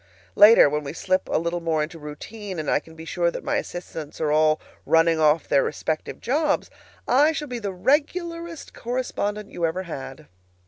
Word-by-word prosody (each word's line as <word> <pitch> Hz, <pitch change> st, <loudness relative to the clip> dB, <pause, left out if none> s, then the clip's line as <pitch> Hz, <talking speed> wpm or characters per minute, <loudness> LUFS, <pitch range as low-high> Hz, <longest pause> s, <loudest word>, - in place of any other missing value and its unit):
Later, 210 Hz, -2 st, +8 dB
when 150 Hz, +1 st, -1 dB
we 140 Hz, -, -6 dB
slip 185 Hz, +2 st, -1 dB
a -, -, +2 dB
little 170 Hz, +2 st, -1 dB
more 160 Hz, -2 st, 0 dB
into 165 Hz, +2 st, -7 dB
routine, 185 Hz, +7 st, -8 dB
and 155 Hz, -2 st, -2 dB
I -, -, +3 dB
can 160 Hz, +1 st, -16 dB
be 160 Hz, 0 st, -10 dB
sure 170 Hz, +2 st, 0 dB
that -, -, -6 dB
my -, -, 0 dB
assistants 160 Hz, -4 st, -6 dB
are 155 Hz, -1 st, 0 dB
all 155 Hz, 0 st, +3 dB, 0.2 s
running 165 Hz, 0 st, +3 dB
off 155 Hz, 0 st, +3 dB
their 140 Hz, -, +3 dB
respective 155 Hz, -1 st, -3 dB
jobs, 300 Hz, +6 st, 0 dB, 0.4 s
I 290 Hz, +5 st, +4 dB
shall 300 Hz, -1 st, -4 dB
be 245 Hz, -2 st, -4 dB
the 205 Hz, -3 st, -3 dB
regularest 330 Hz, -, -1 dB
correspondent 210 Hz, -4 st, -3 dB
you 170 Hz, -, -6 dB
ever 165 Hz, +3 st, 0 dB
had. 145 Hz, -3 st, -8 dB
170 Hz, 185 wpm, -24 LUFS, 155-230 Hz, 0.4 s, Later